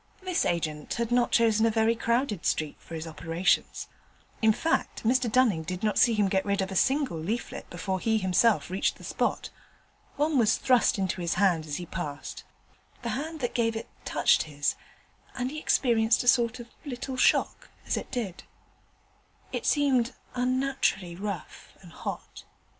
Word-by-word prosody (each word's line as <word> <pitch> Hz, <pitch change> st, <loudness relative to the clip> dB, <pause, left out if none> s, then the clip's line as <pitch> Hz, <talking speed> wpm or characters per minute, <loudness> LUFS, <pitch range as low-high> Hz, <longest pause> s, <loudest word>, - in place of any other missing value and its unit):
This 370 Hz, -2 st, 0 dB
agent 155 Hz, -3 st, -2 dB
had 235 Hz, 0 st, -2 dB
not 245 Hz, 0 st, +2 dB
chosen 225 Hz, -2 st, +3 dB
a 230 Hz, -, +5 dB
very 225 Hz, +1 st, +2 dB
crowded 235 Hz, -, 0 dB
street 155 Hz, -2 st, 0 dB
for 165 Hz, -, -9 dB
his 160 Hz, 0 st, -5 dB
operations: 165 Hz, +3 st, -1 dB, 0.5 s
in 220 Hz, -1 st, +5 dB
fact, 325 Hz, +9 st, -1 dB
Mr 245 Hz, 0 st, +2 dB
Dunning 230 Hz, -9 st, +3 dB
did 180 Hz, +4 st, -5 dB
not 210 Hz, -2 st, +1 dB
see 235 Hz, -3 st, +5 dB
him 205 Hz, -2 st, +2 dB
get 190 Hz, 0 st, +1 dB
rid 200 Hz, 0 st, -1 dB
of 190 Hz, 0 st, -1 dB
a -, -, -4 dB
single 265 Hz, -, +1 dB
leaflet 215 Hz, +9 st, -4 dB
before 190 Hz, +2 st, -3 dB
he 220 Hz, +3 st, +1 dB
himself 185 Hz, -4 st, +2 dB
reached 190 Hz, -, 0 dB
the -, -, -15 dB
spot. -, -, -2 dB, 0.6 s
One 295 Hz, -1 st, +2 dB
was 220 Hz, -3 st, +3 dB
thrust 250 Hz, -2 st, +3 dB
into 190 Hz, -1 st, -1 dB
his 170 Hz, -1 st, -1 dB
hand 175 Hz, -5 st, +2 dB
as 145 Hz, -, -3 dB
he 175 Hz, -, -5 dB
passed: 145 Hz, -3 st, -6 dB, 0.6 s
the 235 Hz, -, -2 dB
hand 305 Hz, +7 st, -4 dB
that 245 Hz, -, -1 dB
gave 230 Hz, -1 st, +1 dB
it 225 Hz, -, -6 dB
touched -, -, +3 dB
his, 145 Hz, 0 st, 0 dB, 0.6 s
and 255 Hz, 0 st, -2 dB
he 305 Hz, -, -5 dB
experienced 230 Hz, -6 st, +2 dB
a -, -, -7 dB
sort 240 Hz, -1 st, +3 dB
of 235 Hz, 0 st, -9 dB
little 265 Hz, -1 st, -5 dB
shock 255 Hz, -, +2 dB, 0.2 s
as -, -, 0 dB
it -, -, -5 dB
did 225 Hz, -9 st, -4 dB
so. -, -, -13 dB, 1.1 s
It -, -, -4 dB
seemed 265 Hz, -4 st, +2 dB, 0.2 s
unnaturally 255 Hz, -8 st, 0 dB
rough 195 Hz, -2 st, -7 dB
and 175 Hz, -3 st, -15 dB
hot. -, -, -7 dB
220 Hz, 175 wpm, -28 LUFS, 180-245 Hz, 1.1 s, a